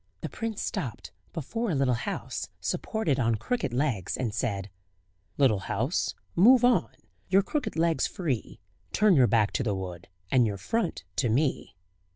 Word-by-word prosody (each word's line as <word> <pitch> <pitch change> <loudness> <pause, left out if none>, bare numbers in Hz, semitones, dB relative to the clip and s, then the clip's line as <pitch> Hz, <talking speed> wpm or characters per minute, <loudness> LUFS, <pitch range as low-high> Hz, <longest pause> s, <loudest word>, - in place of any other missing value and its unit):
The - - -4
prince 225 -2 -4
stopped 120 -6 -4 0.2
before 225 - -3
a 165 - 0
little 135 -2 +2
house, 120 - -4
supported 165 -12 -1
on 115 -2 +2
crooked 245 - -2
legs, 120 - -1
and 120 -5 -2
said: 100 -5 -2 0.7
"Little 130 -8 +4
house, 95 - -1 0.2
move 245 +7 +7
On 250 - +3 0.4
your 195 +1 +5
crooked 290 +4 -2
legs 165 0 +2
free: 140 - -3 0.3
Turn 210 -3 +5
your 130 -4 +6
back 110 -3 +3
to - - -1
the 105 -4 0
wood, 90 -3 -6 0.2
And 125 -3 +5
your 100 -2 -3
front 185 - -2
to 120 - +2
me." 135 +5 0
135 Hz, 160 wpm, -28 LUFS, -, 0.7 s, move